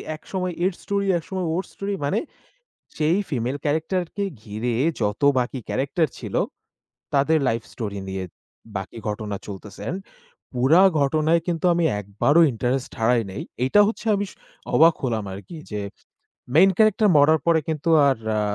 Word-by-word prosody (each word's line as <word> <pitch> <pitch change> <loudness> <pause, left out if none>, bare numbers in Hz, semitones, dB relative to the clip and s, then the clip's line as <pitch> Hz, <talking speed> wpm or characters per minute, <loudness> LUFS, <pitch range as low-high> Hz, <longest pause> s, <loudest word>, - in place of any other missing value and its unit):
একসময় 180 +2 -4
এর 190 - +2
স্টোরি, 200 0 -1
একসময় 180 +2 -4
ওর 185 - -1
স্টোরি। 200 0 -4
মানে, 140 - +1 0.8
সেই 160 +4 +2
ফিমেল 130 0 -2
ক্যারাক্টারকে 175 +6 -1 0.2
ঘিরে 110 +3 -3 0.3
যত 105 +3 -1 0.2
বাকি 125 +1 -2
ক্যারাক্টার 140 +8 0
ছিল, - - -6 0.8
তাদের 150 +3 +3
লাইফ 115 0 -1
স্টোরি 100 -4 -4
নিয়ে 95 0 -3 0.5
বাকি 95 +4 -7
ঘটনা 105 -1 -4
চলতেছেন। 100 - -7 0.6
পুরা 135 +9 +5 0.2
ঘটনায় 155 +4 +2
কিন্তু 170 +1 -2
আমি 170 -1 +1 0.2
একবারও 110 - +3
ইন্টারেস্ট 125 +3 -2
হারাই 115 +1 +3
নাই। 95 - -5 0.2
এটা 205 +9 +5
হচ্ছে 225 - -5
আমি 200 -1 -3 0.4
অবাক 165 +1 +6
হলাম 115 -5 -1
আরকি 130 - -10 0.2
যে, 105 - -2 0.7
মেইন 190 +4 +7
ক্যারাক্টার 215 -1 +4
মরার 150 +1 +5
পরে 165 -1 +4
কিন্তু 155 0 -2 0.2
আর 135 - +2 0.2
আ - - +1
145 Hz, 140 wpm, -23 LUFS, 115-170 Hz, 0.8 s, মেইন